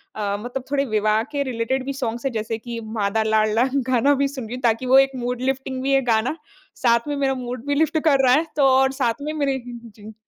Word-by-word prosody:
अ, 205 -1 -2
मतलब 245 +3 -5
थोड़े 280 -1 +1
विवाह 215 -1 +1
के 285 -1 -1
रिलेटेड 255 +1 -2
भी 275 - -3
सॉन्ग्स 240 -2 -4
हैं, 270 - 0
जैसे 220 0 -3
कि 235 0 -7 0.2
माँ 200 -1 +1
दा 220 0 +2
लाडला 215 +1 +2 0.2
गाना 255 +3 +3
भी 280 +1 +1
सुन 265 -4 -7
रही 240 - -5
हूँ, 250 - -8
ताकि 235 +2 +1
वो 260 - +6
एक 270 0 +3
मूड 245 0 -3
लिफ्टिंग 265 0 -2
भी 275 +1 +1
है 270 - +4
गाना। 225 +7 +1 0.5
साथ 235 +2 +3
में 290 - -1
मेरा 270 -1 0
मूड 245 +1 -6
भी 285 - +1
लिफ्ट 315 +1 +2
कर 275 -4 +4
रहा 250 - +5
है, 310 +4 +3
तो 285 - +3
और 265 0 +4
साथ 245 -2 -1
में 300 +1 -3
मेरे 280 -3 0
जी। 225 -3 -11
250 Hz, 245 wpm, -22 LUFS, 225-270 Hz, 0.5 s, वो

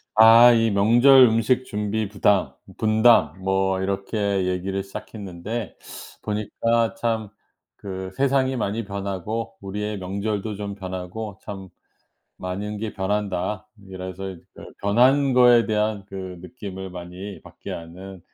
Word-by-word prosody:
아 115 +2 +9
이 115 -1 +3
명절 120 +7 +6
음식 115 +3 +1
준비 105 0 -2
부담, 100 -1 +2 0.3
분담 110 -6 +4
뭐 95 0 +1
이렇게 100 0 -1
얘기를 95 +1 -2
시작했는데 100 +2 -7 0.5
보니까 110 +2 0
참 110 -3 -2 0.5
그 95 -1 -7
세상이 135 -1 +2
많이 110 -1 -2
변하고 100 +3 -4
우리의 105 +2 -4
명절도 100 +2 -3
좀 100 0 -5
변하고 95 +2 -6
참 95 -2 -8 0.7
많은 100 +3 -4
게 110 0 -4
변한다. 105 +1 -2 0.2
이래서 95 +1 -6
이제 90 -3 -11
그 - - -12 0.2
변한 130 +6 +4
거에 125 -2 +6
대한 105 -1 0
그 95 -1 -7
느낌을 95 -1 -8
많이 90 +3 -8
받게 - - -11
하는 90 +3 -8
100 Hz, 250 characters per minute, -23 LUFS, 95-110 Hz, 0.7 s, 아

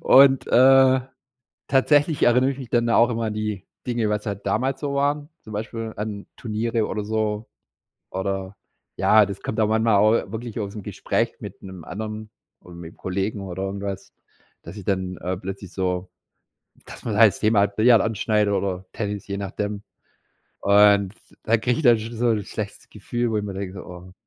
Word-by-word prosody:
Und, 135 -1 +6
äh, 130 +1 +6 0.7
tatsächlich 145 +3 +3
erinnere 125 +2 +4
ich 135 - -6
mich 130 -4 -8
dann 120 -1 +2
da 115 - +3
auch 120 - +5
immer 115 -1 -1
an 105 - -3
die 105 -3 -3 0.2
Dinge, 120 -3 0
was 105 +1 -2
halt 100 -1 -4
damals 135 +1 0
so 145 -2 -2
waren, 145 +1 0 0.2
zum 110 - -10
Beispiel 110 +1 -5
an 105 -1 -5
Turniere 115 0 -1
oder 105 -2 -3
so, 110 0 -2 0.6
oder, 95 0 -3 0.4
ja, 110 -1 +5
das 100 -1 -7
kommt 110 - -2
auch 105 - +3
manchmal 110 -1 +3
auch 105 0 +3
wirklich 115 0 -5
ausm 105 0 -5
Gespräch - - -1
mit - - -9
'nem 95 -3 -10
anderen 110 +2 -6 0.3
oder 90 - -13
mitm 85 -1 -10
Kollegen 100 +3 -3
oder 95 0 -5
irgendwas, 100 0 -5 0.5
dass - - -10
ich 100 - -9
dann, 95 -2 -1
äh, 90 +1 -3
plötzlich 95 0 -7
so 90 -1 -2 0.8
dass - - -12
man 110 - -2
halt 110 0 +7
das - - -10
Thema, 110 -1 +3
halt, 100 0 +1
Billard 115 +1 +6
anschneidet 105 -1 +1
oder 95 -2 -2
Tennis, 105 -2 -4
je 100 0 -3
nachdem. 100 +1 -4 0.8
Und 100 -1 +5 0.3
da 115 +1 +2
kriege 120 +2 0
ich - - -2
dann 120 -5 +6
schon 115 +2 -7
so 120 +2 +1
'n 105 -2 +1
schlechtes 100 0 -7
Gefühl, 120 +3 -3
wo 110 - -1
ich 105 - -1
mir 100 - -5
denke, 95 0 -5
so: - - -8
„Oh, 90 +1 -11
105 Hz, 190 wpm, -23 LUFS, 100-115 Hz, 0.8 s, halt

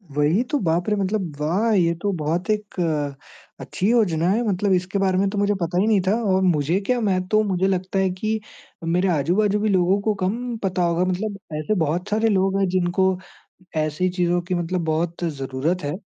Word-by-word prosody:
वही 150 +10 +2
तो, 290 +4 -1
बाप 175 +1 0
रे! 210 - +2
मतलब 195 -5 -2
वाह! 185 +10 +1
ये 170 -4 +3
तो 205 - 0
बहुत 165 +6 -2
एक 210 -1 -2 0.8
अच्छी 195 - -2
योजना 180 -9 +2
है। 215 +5 +2
मतलब 200 0 0
इसके 185 +2 0
बारे 190 -1 +2
में 195 +1 +2
तो 205 - -5
मुझे 205 +1 +2
पता 170 +1 -1
ही 210 - +1
नहीं 210 -3 +3
था - - +4 0.2
और 190 - +2
मुझे 170 0 +2
क्या 250 +2 +1
मैं 190 -4 +1
तो 215 +2 +3
मुझे 190 -2 0
लगता 190 0 -1
है 190 -1 +2
कि 220 0 -1 0.4
मेरे 175 +3 +1
आजू 165 +2 +1
बाजू 210 -1 +2
भी 215 0 0
लोगों 185 +1 +3
को 215 +1 +1
कम 230 +5 -2
पता 185 -2 0
होगा। 170 +1 +1
मतलब 195 +3 -2 0.2
ऐसे 185 +8 -1
बहुत 175 +7 -2
सारे 220 +2 +2
लोग 195 -1 +2
है 195 - +3
जिनको 185 +1 +1 0.6
ऐसी 155 +4 0
चीज़ों 175 -1 0
की 180 +1 -3
मतलब 175 +1 -2
बहुत 165 +2 -1
ज़रूरत 145 +2 -2
है। 145 +1 -2
185 Hz, 205 wpm, -22 LUFS, 170-205 Hz, 0.8 s, था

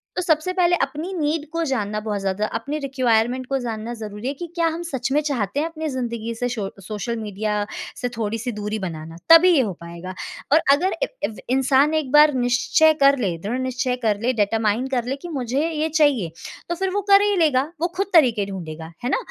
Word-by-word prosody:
तो - - 0
सबसे 325 0 +1
पहले, 355 -1 +3
अपनी 300 +7 -3
नीड 310 -2 -1
को 335 0 -1
जानना 215 -5 -1
बहुत 210 -1 -3
ज़्यादा 195 +2 -1
अपनी 280 +6 -4
रिक्वायरमेंट 255 -2 +1
को 275 - 0
जानना 230 -1 -4
ज़रूरी 215 0 -6
है 275 - -1
कि 315 +5 -7
क्या 335 -1 +2
हम 325 +1 -3
सच 265 -2 -3
में 290 - +3
चाहते 275 -5 -1
हैं 310 - 0
अपने 320 -1 -5
ज़िंदगी 235 -3 -3
से 245 +2 -2
शो 225 -4 -3
अ, - - -4
सोशल 215 +4 -4
मीडिया 210 0 -2 0.4
से 245 - -1
थोड़ी-सी 225 +2 -2
दूरी 210 0 -4
बनाना, 165 -4 -6
तभी 330 +3 +9
ये 275 - +5
हो 210 -6 -2
पाएगा। 170 +2 -8 0.4
और 310 - +7
अगर 360 +7 +3
ए - - +1 0.2
एव 220 - -5
इंसान 270 +3 +3
एक 310 -5 -1
बार 295 0 +7
निश्चय 255 +5 +3
कर 275 0 +6
ले, 185 -8 -1
दृढ़ 210 +9 -3
निश्चय 255 -1 -1
कर 210 -2 +2
ले, 245 +2 +2
डिटरमाइन 220 +2 +1
कर 245 - +1
ले 260 +2 -2
कि 350 - -7
मुझे 270 0 -1
ये 315 0 -1
चाहिए, 290 - +2 0.4
तो 345 - 0
फिर 385 +2 -1
वो 410 - 0
कर 395 0 +8
ही 410 0 +2
लेगा, 295 -6 +3 0.2
वो 345 - +2
खुद 395 - 0
तरीके 240 - +5
ढूँढेगा, 160 -3 -7
है 245 - -1
ना। - - +2
255 Hz, 220 wpm, -22 LUFS, 215-305 Hz, 0.4 s, तभी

